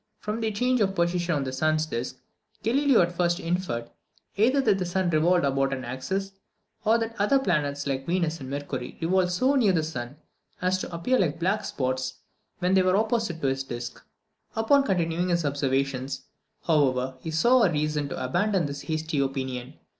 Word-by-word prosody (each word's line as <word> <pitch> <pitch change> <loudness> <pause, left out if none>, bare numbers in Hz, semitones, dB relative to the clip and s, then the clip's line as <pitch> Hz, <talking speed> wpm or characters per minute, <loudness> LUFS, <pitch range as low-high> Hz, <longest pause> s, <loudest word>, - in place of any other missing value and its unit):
From 215 +2 -4
their 220 - +1
change 250 +3 +1
of 195 -1 +1
position 175 -1 +1
on 140 - 0
the 130 -1 -4
sun's 155 +3 +1
disc, 130 -3 -4 0.5
Galileo 270 +1 +4
at 175 - -1
first 175 0 +1
inferred, 165 -10 -2 0.4
either 245 +7 +3
that 210 -7 +3
the - - 0
sun 180 0 0
revolved 170 +1 +3
about 135 0 +1
an 130 -2 -4
axis, 190 +11 -3 0.5
or 220 +2 +4
that 225 0 -3
other 210 +7 +4
planets, 150 - 0
like 135 -1 -2
Venus 170 -2 0
and 130 -2 -7
Mercury, 140 -3 -5
revolved 180 +2 +2
so 255 +10 +2
near 230 -9 +4
the 160 -3 +2
sun 140 -3 -5 0.4
as 185 +1 +1
to - - -5
appear 175 +10 +1
like 160 -6 0
black 190 +5 0
spots 130 -1 -2 0.4
when 180 +1 +1
they 190 - +5
were 185 +1 +3
opposite 220 -6 0
to 140 - +1
his 135 0 -1
disc. 120 -2 -7 0.5
Upon 225 +6 +4
continuing 175 -4 0
his 170 -2 +1
observations, 135 -1 -1 0.4
however, 130 -5 +2
he 160 - -6
saw 235 +11 +4
reason 150 -3 0
to 130 - -4
abandon 185 +5 +1
this 140 0 -5
hasty 155 -2 -2
opinion. 130 -1 -3
165 Hz, 180 wpm, -26 LUFS, 135-195 Hz, 0.5 s, they